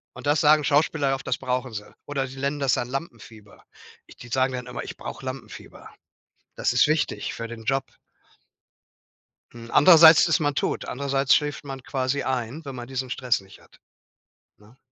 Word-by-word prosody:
Und - - -8
das 145 +1 +3
sagen 150 0 +5
Schauspieler 145 -1 +1
oft, 135 - -9
das 125 - 0
brauchen 125 -1 -3
sie 105 -1 -7 0.2
oder 135 -2 -3
sie 135 +1 -11
nennen 140 +2 -2
das 135 -2 +1
dann 120 - -1
Lampenfieber. 115 -7 -8 0.6
Die - - -10
sagen 130 +2 0
dann 125 -1 -5
immer: - - -6
„Ich - - -9
brauche - - -8
Lampenfieber. 130 -1 -9 0.7
Das - - 0
ist - - +4
wichtig 155 0 -1
für 115 - -6
den 115 -1 -9
Job.” 135 +3 0 1.7
Hm, 115 -1 -11
andererseits 165 0 +8
ist 165 - +2
man 145 -2 0
tot, - - -2
andererseits 135 0 +1
schläft 145 -1 -2
man 135 -2 -7
quasi 130 +1 -2
ein, 130 +4 -3
wenn 135 -2 -7
man 120 -1 -7
diesen 130 0 -4
Stress 120 -3 0
nicht 95 0 -17
hat, - - -23 0.8
ne? 105 +5 -21
135 Hz, 175 wpm, -24 LUFS, 125-145 Hz, 1.7 s, andererseits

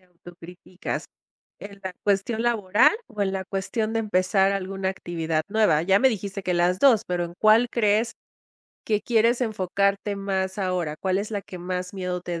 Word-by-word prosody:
te 185 - -28
auto 175 0 -15
críticas? 180 +1 -6 0.5
¿En 200 -1 -10
la 185 -1 -4
cuestión 205 +3 +1
laboral 210 - +3
o 210 -4 -5
en 190 -1 +1
la 190 -1 -3
cuestión 215 +3 -2
de 225 - +1
empezar 195 -1 +2
alguna 195 0 -2
actividad 165 -4 -2
nueva? 210 -8 +3
Ya 195 +3 +4
me 265 - +5
dijiste 200 -3 -4
que 180 - 0
las 175 +1 +2
dos. 250 -7 +5
Pero, 175 -1 -1
¿en 170 - -9
cuál 220 +3 +5
crees 220 0 +1 0.7
que 210 -2 +1
quieres 235 +1 +2
enfocarte 200 -1 0
más 190 -1 -2
ahora? 180 -5 -1
¿Cuál 190 +2 0
es 210 +2 -4
la 205 -2 -3
que 185 - -10
más 180 +1 -4
miedo 180 -2 -3
te 175 -2 -4
195 Hz, 185 wpm, -24 LUFS, 180-210 Hz, 0.7 s, me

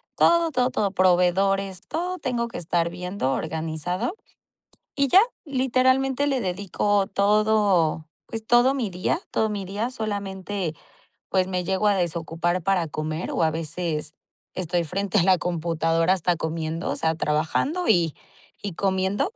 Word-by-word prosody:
todo, 340 -1 +4
todo, 250 -2 +2
todo 205 -5 0
proveedores, 185 +1 +2
todo. 360 +3 -2
Tengo 240 -2 -1
que - - -7
estar 170 0 0
viendo 180 -5 -3
organizado 160 - -3 0.8
y 280 -1 +2
ya 375 +9 +7 0.2
literalmente 265 0 +2
le 270 -3 0
dedico 200 +1 0
todo. 200 -6 +2 0.2
Pues 225 -1 -6
todo 240 +3 +5
mi 245 -7 -2
día 180 - -1
todo 220 -1 +1
mi 205 -2 -3
día 210 +6 -2
solamente 200 -6 -4 0.6
pues 185 -1 +2
me 180 -1 -2
llego 195 +2 +1
a 205 - +4
desocupar 170 0 -1
para 180 -3 +1
comer 155 +2 -4
o 165 - 0
a 160 - +3
veces 160 -1 -3 0.4
estoy 175 -1 -1
frente 195 +5 0
a - - +3
la 185 0 +5
computadora 165 0 +1
hasta 180 -1 +1
comiendo, 160 +1 -3
o - - -2
sea, 160 0 0
trabajando 160 - 0
y 165 -4 +3 0.5
y 200 -3 -3
comiendo. 190 - 0
190 Hz, 145 wpm, -24 LUFS, 170-215 Hz, 0.8 s, ya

